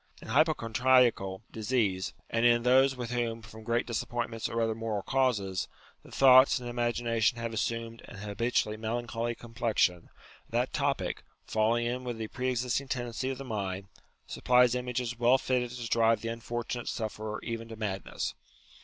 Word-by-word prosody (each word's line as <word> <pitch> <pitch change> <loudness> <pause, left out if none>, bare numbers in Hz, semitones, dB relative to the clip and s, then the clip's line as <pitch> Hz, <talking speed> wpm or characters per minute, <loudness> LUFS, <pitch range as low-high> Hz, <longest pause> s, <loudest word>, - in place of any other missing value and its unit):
In - - -11
hypochondriacal 125 - +3
disease, 105 -4 -1
and 115 0 0
in 120 -1 +5
those 130 +2 +5
with 120 -2 -5
whom, 115 -2 -2
from 110 0 -11
great 115 +1 0
disappointments 120 -1 -3
or 115 - -2
other 115 -1 +1
moral 110 -3 -3
causes, 110 -9 0 0.3
the - - -16
thoughts 130 0 +7
and 125 -2 -6
imagination 120 -1 0
have 115 -1 -4
assumed 115 +1 -3
an - - -11
habitually 105 +1 -1
melancholy 120 +1 -2
complexion, 115 -7 0 0.4
that 120 +2 0
topic, 140 -11 -1 0.2
falling 115 +2 +1
in 125 +2 -2
with 120 -2 -4
the 110 -1 -5
pre 130 +1 -2
existing 125 +2 -1
tendency 125 0 -3
of 135 - -3
the 135 - -7
mind, 100 -4 -4 0.4
supplies 125 -1 +3
images 125 -1 -3
well 120 +2 +5
fitted 125 -2 0
to 120 -1 -6
drive 115 -1 +3
the 115 - -3
unfortunate 120 +1 -4
sufferer 110 -1 -4
even 115 -1 -4
to 115 - -8
madness. 100 -3 -3
115 Hz, 155 wpm, -30 LUFS, 110-125 Hz, 0.4 s, thoughts